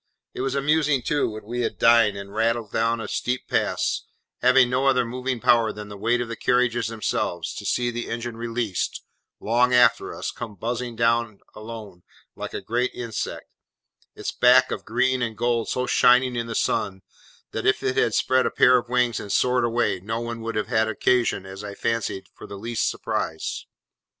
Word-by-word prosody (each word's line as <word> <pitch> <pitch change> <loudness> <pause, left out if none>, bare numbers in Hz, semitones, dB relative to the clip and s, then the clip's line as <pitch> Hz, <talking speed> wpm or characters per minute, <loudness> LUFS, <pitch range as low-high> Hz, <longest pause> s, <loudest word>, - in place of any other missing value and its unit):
It - - -5
was 135 +1 -1
amusing, 150 -1 +2
too, 145 -4 +1
when 110 0 -8
we 120 +3 -4
had 120 - -2
dined, 115 -3 +5
and 100 0 -8
rattled 115 0 0
down 115 +1 +1
a 110 - -5
steep 125 +4 -2
pass, - - 0 0.4
having 125 0 +5
no 130 +2 +1
other 125 -2 +3
moving 125 +1 -3
power 115 0 +3
than 105 0 -9
the 105 - -8
weight 115 +4 0
of 120 - -3
the 115 - -5
carriages 120 -1 +1
themselves, 110 -1 -2
to - - -6
see 120 -1 0
the 120 0 -5
engine 120 0 -4
released, 115 -4 -3 0.4
long 125 +3 +2
after 125 - +4
us, - - -4
come 115 -4 -8
buzzing 120 +4 -4
down 115 -2 +1
alone, 110 -4 -9 0.3
like - - -6
a - - -3
great 120 +2 0
insect, 115 -3 -4 0.7
its - - -4
back 125 +1 +5
of - - -4
green 130 +2 +1
and 115 -3 -2
gold 120 0 0
so 125 - -1
shining 125 0 +4
in 115 -1 -2
the 115 - -5
sun, 95 -3 -1 0.5
that 110 - -2
if 130 - +2
it 130 -1 0
had 110 - +2
spread 130 0 +2
a - - +1
pair 125 0 +5
of 120 - -11
wings 125 -2 +1
and 100 - -7
soared 125 +4 +2
away, 120 -4 +1
no 110 +5 -3
one 115 -1 -5
would 115 0 -4
have 105 - 0
had 110 0 +2
occasion, 115 -2 +1
as 95 +1 -9
I 100 -1 -7
fancied, 115 -4 -2
for - - -11
the 100 - -8
least 115 +3 -1
surprise. 80 0 -3
115 Hz, 195 wpm, -24 LUFS, 110-125 Hz, 0.7 s, dined